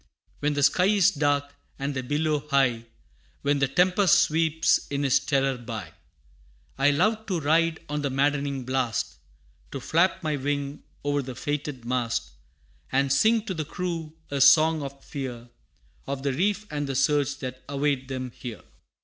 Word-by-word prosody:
When 145 0 0
the 145 - +1
sky 160 +6 +4
is 205 -1 +4
dark, 145 -2 0 0.2
and 140 +1 -3
the 130 - -2
billow 150 +2 -1
high, 125 -5 +2 0.6
When 145 0 +2
the 135 - +3
tempest 180 +6 +4
sweeps 160 0 +2
in 140 0 -2
its 130 - +4
terror 135 -2 0
by, 110 -8 -6 0.8
I 135 +1 +3
love 215 +9 +1
to 185 -5 0
ride 160 +2 +2
on 150 0 -2
the 140 - -1
maddening 140 0 0
blast 130 -4 -1 0.5
To 135 - -5
flap 170 +7 +1
my 155 -2 0
wing 140 +1 -3 0.2
o'er 145 0 +1
the 130 -2 -7
fated 145 -2 -4
mast, 120 -2 -1 0.6
And 135 +1 +2
sing 220 +9 +3
to 200 - -3
the 160 -3 -3
crew 165 -1 -4 0.2
a 140 -1 -1
song 160 +2 +6
of 140 0 -8
fear, 125 -4 -6 0.6
Of 135 0 -4
the 140 -2 0
reef 205 +8 0
and 145 -1 -2
the 135 - -3
surge 145 +1 +2
that 130 -2 -6
await 140 -2 0
them 130 -1 -4
here. 120 -2 -8
145 Hz, 165 wpm, -26 LUFS, 135-155 Hz, 0.8 s, song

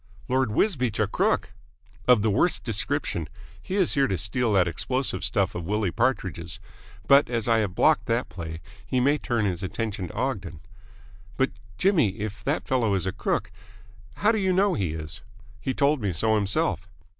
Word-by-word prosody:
"Lord 130 -1 +1
Wisbeach 125 - +1
a 110 - +4
crook!" 95 -2 0 0.5
"Of 125 -5 +6
the 110 - +2
worst 175 - +2
description. 100 - -2 0.3
He 190 - -4
is 190 -4 +2
here 140 -1 +3
to 95 - -1
steal 110 +6 0
that 95 -3 +4
explosive 130 - -2
stuff - - +1
of 85 -1 -5
Willie 105 -2 0
Partridge's. 85 0 -1 0.5
But 140 -1 +6
as 115 -2 -1
I 115 -1 +4
have 100 -4 -1
blocked - - +3
that - - 0
play, 80 0 -7 0.2
he 125 +5 0
may 145 +4 +3
turn 120 -5 0
his 90 -3 -1
attention 100 0 -3
to - - -10
Ogden." 105 - -3 0.8
"But, 130 - +2 0.3
Jimmy, 155 - +2
if 105 -1 -5
that 95 +3 -1
fellow 115 -6 +2
is 95 -2 -1
a 95 - 0
crook - - -2 0.6
how 210 - +3
do 220 - 0
you 190 -1 +1
know 195 +2 +3
he 90 -6 -1
is?" 80 0 -6 0.4
"He 130 - -2
told 145 -1 +2
me 100 -3 -1
so 110 +7 +1
himself." 100 -3 0
110 Hz, 180 wpm, -26 LUFS, 95-130 Hz, 0.8 s, Of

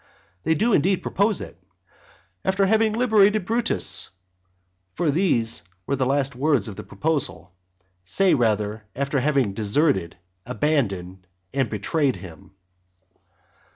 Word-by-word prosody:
They 160 +1 +3
do 225 +8 +1
indeed 185 +4 +2
propose 205 +1 +1
it, 90 - -10 0.8
"after 190 +1 +2
having 220 +2 +2
liberated 215 -4 +3
Brutus," 230 +3 +1 0.9
for 160 -4 +1
those 130 - +1 0.2
were 140 - 0
the 130 -1 0
last 135 -1 0
words 135 -5 +1
of 105 - -7
the 105 - -8
proposal, 95 - -2 0.5
say 180 - +2
rather, 110 -4 0
after 140 +1 -1
having 135 -6 +1
deserted, 105 - +1 0.3
abandoned, 100 - -2 0.3
and 135 -4 0
betrayed 130 +6 0
him. 95 0 -12
140 Hz, 120 wpm, -23 LUFS, -, 0.9 s, They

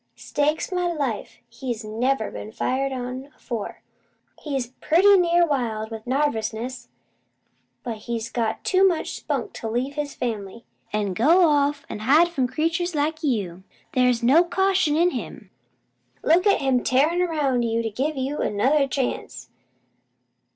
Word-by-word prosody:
"Stake 300 +2 -1
my 360 -1 0
life 275 -10 -3
he's 235 -2 -5
never 225 +2 -1
been 215 - -7
fired 270 +4 -1
on 255 +1 -5
afore! 230 -4 -6 0.6
He's 270 -5 -3
pretty 390 +5 +5
near 345 -1 +4
wild 230 -7 -2
with 225 +1 -8
narvousness, 245 -3 -2 1.0
but 235 -3 -4
he's 230 +1 -4
got 225 -2 -2
too 375 0 +3
much 345 -4 -1
spunk - - -3
to 225 - -5
leave 250 +5 -2
his 295 -1 -4
fam'ly, 225 -2 -4 0.3
an' 205 -2 -1
go 330 - +5
off 290 -1 +1
an' - - -6
hide 300 +10 +4
from 270 -7 0
creatures 330 +6 -1
like 310 +2 -1
you. 200 - -1 0.3
They's 250 -2 +2
no 285 +8 +6
caution 370 -3 +1
in 350 +2 +3
him. - - -7 0.7
Look 350 +5 +4
at 400 - +3
him 265 -2 +1
tearin' 300 +7 +2
'round 295 -8 +1
to 230 -1 0
give 280 +7 -2
you 270 +3 -2
another 275 +8 +2
chance! 265 -1 -3
270 Hz, 145 wpm, -24 LUFS, 230-315 Hz, 1.0 s, no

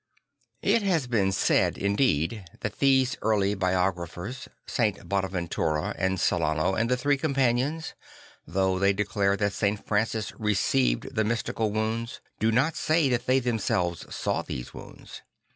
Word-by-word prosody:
It 230 - +3
has 180 -8 +1
been 105 -6 +1
said, 95 - +2
indeed, 100 - 0 0.2
that 105 - -4
these 135 0 +3
early 105 -2 +2
biographers, 95 +4 -2 0.2
St. 110 -5 -1
Bonaventura 90 -5 -1
and 95 0 0
Celano 80 0 +1
and 115 +3 0
the 125 - +2
Three 145 +3 +1
Companions, 135 +2 0 0.5
though 95 +3 +1
they 100 +1 +3
declare 100 0 0
that 100 -1 0
St. 100 +1 -1
Francis 110 +1 -1
received 80 - +1
the 110 - +1
mystical 110 -1 -1
wounds, 110 +2 -2 0.2
do 110 +1 +2
not 135 +8 +2
say 155 -3 +2
that 125 -1 -1
they 130 +1 +4
themselves 100 -8 -1
saw - - -1
those - - -7
wounds. - - -11
105 Hz, 140 wpm, -27 LUFS, 95-125 Hz, 0.5 s, they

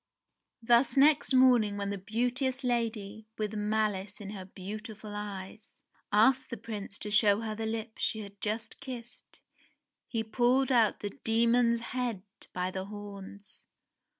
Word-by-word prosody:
Thus 240 +4 +4
next 290 +1 +5
morning 245 -6 +5
when 200 0 -2
the 200 - -2
beauteous 250 +6 -1
lady, 220 -3 -2
with 215 -1 -2
malice 210 -2 -1
in 205 -1 -7
her 190 -3 -7
beautiful 210 +3 -8
eyes, 205 0 -8 0.3
asked 255 +5 +4
the 235 - -5
Prince 205 -2 -6
to 210 - -4
show 210 0 +5
her 220 -1 -3
the 220 +1 -3
lips 220 0 -4
she 220 - 0
had 200 0 -11
last 220 +2 -3
kissed, 250 -3 -9 0.7
he 225 -2 -2
pulled 250 +4 +2
out 230 -4 +3
the 205 - -3
demon's 235 +1 +3
head 240 -7 -2 0.3
by 180 0 -2
the 190 0 -4
horns. 200 -1 -10
220 Hz, 145 wpm, -30 LUFS, 205-240 Hz, 0.7 s, next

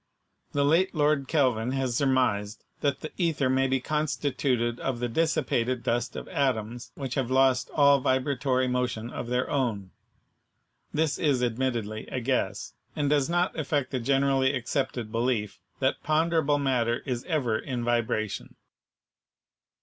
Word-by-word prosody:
The 140 -1 +2
late 170 +6 +3
Lord 145 -2 +2
Kelvin 130 -5 +1
has 130 -3 -1
surmised 115 -6 +1 0.2
that 140 -1 0
the 155 - -6
ether 155 -7 +1
may 135 0 +2
be 135 0 +1
constituted 135 -4 -1
of 130 -3 -2
the 120 - -1
dissipated 130 -3 0
dust 120 0 -1
of - - -6
atoms 120 - -1
which 135 -3 -4
have 130 -3 -1
lost 130 0 +3
all 140 -1 +5
vibratory 130 -1 +1
motion 125 -2 -2
of 120 - -5
their 125 +1 0
own. 110 -9 -1 1.0
This 155 -1 0
is 140 -6 +2
admittedly 115 -3 -2
a 130 - -3
guess, 125 +1 -1 0.2
and 145 -1 0
does 145 0 +2
not 175 +2 +1
affect 145 -2 -1
the 130 - -1
generally 135 +1 +2
accepted 125 -3 -2
belief 115 -3 -1 0.2
that - - 0
ponderable 155 -1 +2
matter 125 -4 0
is 125 -2 -3
ever 130 -10 0
in 125 -3 -4
vibration. 115 -3 -1
130 Hz, 140 wpm, -27 LUFS, 120-140 Hz, 1.0 s, all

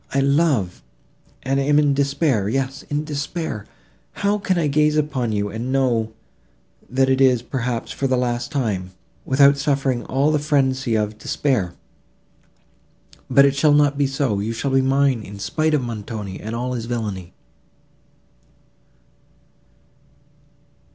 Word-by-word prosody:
I - - +4
love, 140 - +1 0.6
and 135 +1 0
am 145 +2 +2
in 145 -2 +4
despair—yes—in 135 0 -1
despair. 145 - -4 0.5
How 205 +1 0
can 190 -2 0
I 170 - +1
gaze 150 +1 +2
upon 135 -6 -1
you, 105 -1 -1
and 115 +5 -4
know, 120 -5 +1 0.8
that 130 +1 +2
it 130 0 +2
is, 125 -3 +4
perhaps, 125 -2 -3
for 135 - -2
the 130 -1 +1
last 120 +1 -2
time, 100 -10 -2 0.3
without 140 +1 +4
suffering 135 -3 0
all 140 +3 +1
the 150 - +2
frenzy 130 -5 +1
of 105 0 -2
despair? 110 -10 -1 1.5
But 140 - +6
it 140 0 +2
shall 145 +1 +4
not 145 -1 +4
be 140 -1 +1
so; 135 -6 -1
you 110 +3 -2
shall 135 +4 -2
be 135 0 +4
mine, 135 -2 +2
in 100 -1 -9
spite 155 +10 0
of 140 - 0
Montoni 105 -4 -6
and 110 +2 -5
all 125 +2 -2
his 115 -2 -4
villany." 105 -7 -4
135 Hz, 140 wpm, -21 LUFS, 115-140 Hz, 1.5 s, But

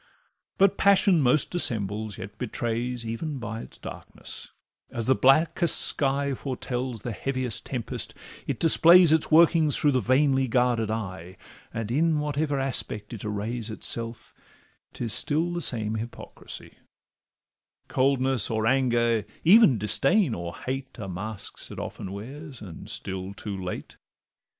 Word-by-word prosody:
But 195 0 +3
passion 195 -3 +4
most 135 +3 +2
dissembles, 110 - +1
yet 100 -1 -9
betrays 120 0 -3
Even 135 +7 -4
by 110 -2 -5
its - - -12
darkness; - - -7 0.4
as 115 -2 -4
the 130 - +4
blackest 155 +6 +4
sky 140 0 +2
Foretells 125 -3 -4
the 120 - -3
heaviest 130 -1 -2
tempest, 125 -4 -5 0.3
it - - -2
displays 170 +1 +6
Its 160 0 +2
workings 160 -2 +5
through 145 - +3
the 130 - +2
vainly 130 +3 +2
guarded 120 -2 +1
eye, 95 -5 -5 0.3
And 115 0 -4
in 160 +4 +2
whatever 150 -1 -1
aspect 120 -5 -2
it 110 - -7
arrays 110 +2 -3
Itself, 115 +1 -3 0.6
'tis 115 -3 -4
still 165 +4 0
the 175 - -2
same 110 -7 +1
hypocrisy; 115 +2 -8 1.1
Coldness 130 -3 +1
or 110 -1 -1
anger, 120 -3 +2 0.2
even 180 - +7
disdain 135 - +2
or 85 -2 -5
hate, 130 0 -6
Are 100 - -5
masks 100 +3 -5
it - - -9
often 95 - -6
wears, 135 +7 -9
and 95 -6 -10
still 95 +1 -5
too 105 0 -6
late. 90 -1 -6
125 Hz, 135 wpm, -26 LUFS, 110-145 Hz, 1.1 s, even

